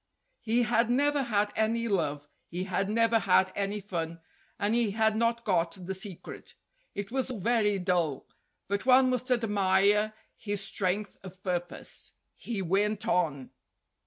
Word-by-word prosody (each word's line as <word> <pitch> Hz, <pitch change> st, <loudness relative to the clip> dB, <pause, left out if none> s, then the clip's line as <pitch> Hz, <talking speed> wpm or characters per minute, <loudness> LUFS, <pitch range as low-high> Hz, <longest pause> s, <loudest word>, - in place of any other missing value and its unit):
He 235 Hz, +2 st, +1 dB
had 230 Hz, +1 st, +2 dB
never 285 Hz, +3 st, +2 dB
had 210 Hz, -4 st, 0 dB
any 230 Hz, +2 st, +1 dB
love; 150 Hz, -8 st, -1 dB, 0.2 s
he 180 Hz, +2 st, -4 dB
had 195 Hz, +1 st, -1 dB
never 230 Hz, +1 st, +3 dB
had 185 Hz, -1 st, +3 dB
any 200 Hz, +1 st, -1 dB
fun; 170 Hz, -4 st, -4 dB, 0.4 s
and 205 Hz, +2 st, 0 dB
he 235 Hz, -2 st, +3 dB
had 220 Hz, -1 st, +3 dB
not 230 Hz, +1 st, +1 dB
got 180 Hz, -1 st, 0 dB
the 190 Hz, -, -3 dB
secret. 190 Hz, -1 st, -7 dB, 0.4 s
It 200 Hz, +1 st, -5 dB
was 265 Hz, 0 st, -1 dB
very 220 Hz, -2 st, +1 dB
dull, 175 Hz, -7 st, 0 dB, 0.4 s
but 200 Hz, +5 st, -2 dB
one 255 Hz, 0 st, +6 dB
must 255 Hz, +1 st, -1 dB
admire 210 Hz, -2 st, +2 dB, 0.2 s
his 205 Hz, -2 st, -3 dB
strength 195 Hz, +1 st, -2 dB
of 185 Hz, 0 st, -12 dB
purpose. 175 Hz, -3 st, -4 dB, 0.2 s
He 215 Hz, -5 st, -4 dB
went 210 Hz, +5 st, 0 dB
on. 160 Hz, -, 0 dB
205 Hz, 145 wpm, -29 LUFS, 185-230 Hz, 0.4 s, one